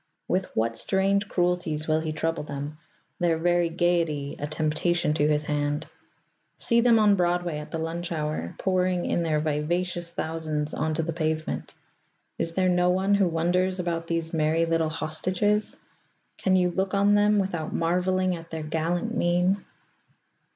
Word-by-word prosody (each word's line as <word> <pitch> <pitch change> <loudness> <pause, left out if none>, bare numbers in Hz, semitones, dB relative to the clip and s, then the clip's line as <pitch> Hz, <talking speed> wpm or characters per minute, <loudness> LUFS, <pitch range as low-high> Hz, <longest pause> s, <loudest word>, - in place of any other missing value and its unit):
With 185 +1 0
what 115 +1 +1
strange 195 - +1
cruelties 175 -4 0
will 155 0 +2
he 160 -1 -3
trouble 165 +1 -1
them, 145 +1 -6 0.4
their 170 -2 +2
very 175 +1 +2
gayety 165 -4 0
a 145 - -3
temptation 155 +1 0
to 150 -1 +2
his 150 0 +1
hand? 145 0 -1 0.7
See 235 -1 +3
them 235 -1 +5
on 210 -2 +5
Broadway 175 -3 0
at 150 - -8
the 165 - -3
lunch 170 +2 -4
hour, 150 - -3
pouring 185 -1 +1
in - - 0
their 155 -2 +1
vivacious 170 +3 -1
thousands 155 -2 -3
onto 155 +1 -1
the 165 +1 -3
pavement. 160 -1 -2 0.6
Is 165 - -1
there 185 +1 +2
no 180 0 +3
one 190 +2 +2
who 200 -2 +4
wonders 180 +3 +1
about 170 -2 -2
these 165 -1 -2
merry 160 +1 +2
little 165 -1 +1
hostages? 185 +7 0 0.6
Can 190 -1 +2
you 180 -1 +3
look 190 +2 -1
on 200 +1 +4
them 205 0 +4
without 175 -5 -1
marvelling 180 +2 +1
at 165 0 -10
their 160 -1 -5
gallant 170 +8 -1
mien? 180 +1 +2
170 Hz, 160 wpm, -26 LUFS, 155-185 Hz, 0.7 s, them